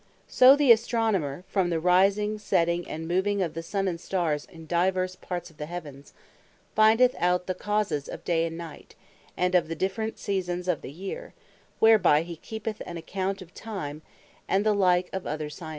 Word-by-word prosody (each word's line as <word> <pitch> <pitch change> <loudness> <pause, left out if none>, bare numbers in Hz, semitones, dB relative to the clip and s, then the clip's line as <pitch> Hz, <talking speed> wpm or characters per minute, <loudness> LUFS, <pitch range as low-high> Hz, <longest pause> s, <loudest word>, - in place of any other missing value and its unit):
So 255 +2 +7
the 285 -4 +5
Astronomer, 220 - +1
from 190 -3 0
the 165 -2 0
Rising, 195 +5 +3
Setting, 170 -3 0
and 160 +1 -5
Moving 190 +4 +1
of 170 - -3
the 165 - -4
Sun, 195 +3 -2
and 170 -2 -3
Starres, 165 -7 -1
in 165 -2 -13
divers 185 +2 0
parts 180 -2 -6
of 155 - -25
the 150 - -5
Heavens, 150 -5 -8 0.6
findeth 225 +4 +5
out 180 0 +1
the 185 - -2
Causes 200 -7 -1
of - - -8
Day, 165 -1 +1
and 165 0 -7
Night, 165 -3 -10 0.4
and 180 +1 +1
of 180 -3 +3
the 165 - -4
different 205 +6 -2
Seasons 180 -2 -3
of 175 -5 0
the - - -8
Year; 190 +6 -7 0.4
whereby 215 -9 +5
he 170 -1 -8
keepeth 220 +3 -6
an 175 - -6
account 190 +3 -3
of 175 - -20
Time: 160 -9 -6 0.5
And 195 +2 +1
the 215 - +4
like 180 -3 +3
of 190 -1 -4
other 150 0 -4
Sciences. 160 +1 -8
180 Hz, 185 wpm, -27 LUFS, 165-205 Hz, 0.6 s, So